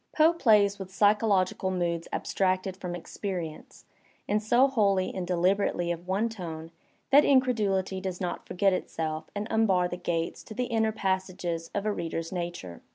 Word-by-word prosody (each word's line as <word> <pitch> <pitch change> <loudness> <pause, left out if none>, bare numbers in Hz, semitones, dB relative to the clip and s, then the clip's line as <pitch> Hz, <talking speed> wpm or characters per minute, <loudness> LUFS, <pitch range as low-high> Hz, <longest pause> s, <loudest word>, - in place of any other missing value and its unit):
Poe 320 +2 +6
plays 210 -10 +4
with 190 -1 -7
psychological 200 -2 +2
moods 170 -2 -1
abstracted 185 0 0
from 180 -2 -5
experience 175 -2 -6 0.4
and 210 +1 +1
so 240 +5 +4
wholly 200 -7 +1
and 185 -2 -4
deliberately 180 0 +1
of 175 +1 -6
one 200 +5 +1
tone 165 -7 -7 0.4
that 285 +2 +8
incredulity 210 -8 +2
does 185 -2 -4
not 180 -2 -4
forget 195 +1 +2
itself 160 -3 -3
and 205 +1 -3
unbar 195 -5 +3
the 175 - -5
gates 170 -2 -2
to 220 - -9
the 250 - 0
inner 225 -2 +1
passages 185 -4 -2
of 200 0 -1
a 215 - +1
reader's 165 -2 -4
nature. 175 - -5
190 Hz, 160 wpm, -28 LUFS, 175-210 Hz, 0.4 s, that